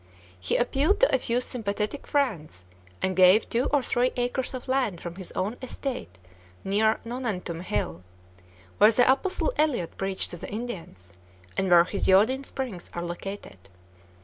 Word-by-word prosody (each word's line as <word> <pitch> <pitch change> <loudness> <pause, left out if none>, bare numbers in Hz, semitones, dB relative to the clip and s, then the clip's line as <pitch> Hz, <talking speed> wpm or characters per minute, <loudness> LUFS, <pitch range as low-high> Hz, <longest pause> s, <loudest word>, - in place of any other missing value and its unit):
He 90 - -1
appealed 275 +9 +2
to - - +4
a - - +1
few 240 0 0
sympathetic 215 +1 -3
friends 175 - -1 0.4
and 185 0 +1
gave 185 +4 +6
two 240 +3 0
or 285 -2 +1
three 250 +1 +1
acres 245 +1 -2
of 255 - -7
land 255 -9 0
from 170 0 -6
his 190 - -6
own 205 +6 -2
estate, 255 - -5 0.5
near 215 +3 +2
"Nonantum 220 -9 -4
Hill," 90 - -2 0.8
where 210 +2 +8
the 245 +2 +4
Apostle 375 - +1
Eliot 265 - +1
preached 195 0 -2
to 175 - -6
the - - -7
Indians, 180 - -7 0.4
and 190 - 0
where 175 -1 +7
his 195 +3 -2
iodine 220 +8 +4
springs 255 -10 -6
are 170 - -3
located. 175 - -7
215 Hz, 155 wpm, -26 LUFS, 180-255 Hz, 0.8 s, where